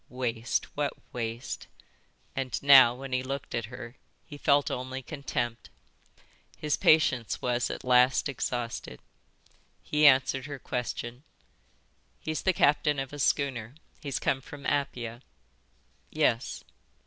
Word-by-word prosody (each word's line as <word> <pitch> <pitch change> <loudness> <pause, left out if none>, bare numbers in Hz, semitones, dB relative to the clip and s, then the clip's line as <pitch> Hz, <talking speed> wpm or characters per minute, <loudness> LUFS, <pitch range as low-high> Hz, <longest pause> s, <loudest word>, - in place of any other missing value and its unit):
Waste, 120 -2 -1
what 145 -1 -1 0.2
waste! 115 +1 -4 0.7
And 130 -2 -2
now, 130 -4 +8
when 135 0 -7
he 130 - +1
looked 135 +1 -5
at 115 -1 -1
her, 120 +1 -9 0.3
he 145 - -10
felt 145 0 +2
only 130 +1 -4
contempt. 120 - -4 0.9
His 150 -2 0
patience 135 -7 +3
was 125 0 0
at - - -5
last 125 +1 +4
exhausted. 120 - -4 0.8
He 150 0 +4
answered 135 0 +4
her 145 -1 -6
question. 125 -1 -4 1.0
"He's 155 0 -3
the 190 - +3
captain 150 -2 +3
of 135 0 -4
a 145 - -7
schooner. 130 -4 0 0.3
He's 140 -3 -3
come 135 - 0
from 145 0 -11
Apia." 120 -5 -2 0.9
"Yes." 115 +2 0
130 Hz, 125 wpm, -28 LUFS, 120-140 Hz, 1.0 s, now